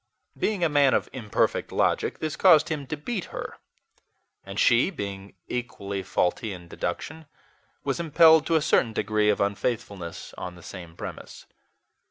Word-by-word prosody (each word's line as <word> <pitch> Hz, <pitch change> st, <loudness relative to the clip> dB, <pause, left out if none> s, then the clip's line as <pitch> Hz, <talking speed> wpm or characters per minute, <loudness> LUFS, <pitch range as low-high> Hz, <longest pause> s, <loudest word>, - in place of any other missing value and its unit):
Being 205 Hz, -5 st, -1 dB
a -, -, +5 dB
man 145 Hz, -3 st, +4 dB
of -, -, 0 dB
imperfect 115 Hz, -6 st, -1 dB
logic, -, -, +1 dB
this 155 Hz, -1 st, -3 dB
caused 160 Hz, -5 st, +6 dB
him 145 Hz, -4 st, -3 dB
to 150 Hz, -, -4 dB
beat 190 Hz, +6 st, -4 dB
her; -, -, -7 dB, 0.8 s
and 100 Hz, +1 st, -6 dB
she, 120 Hz, +8 st, +4 dB
being 100 Hz, -, -7 dB
equally 100 Hz, -5 st, -4 dB
faulty 95 Hz, +3 st, -1 dB
in 90 Hz, -2 st, -10 dB
deduction, 150 Hz, -, -5 dB, 0.6 s
was 135 Hz, +1 st, -1 dB
impelled 160 Hz, -1 st, +6 dB
to 165 Hz, -, +2 dB
a 155 Hz, -, +3 dB
certain 120 Hz, -6 st, +2 dB
degree 105 Hz, 0 st, +1 dB
of 105 Hz, -, +2 dB
unfaithfulness 100 Hz, -4 st, -3 dB
on 90 Hz, -1 st, -6 dB
the 85 Hz, -, -14 dB
same 85 Hz, -3 st, -9 dB
premise. -, -, -8 dB
120 Hz, 155 wpm, -26 LUFS, 100-155 Hz, 0.8 s, caused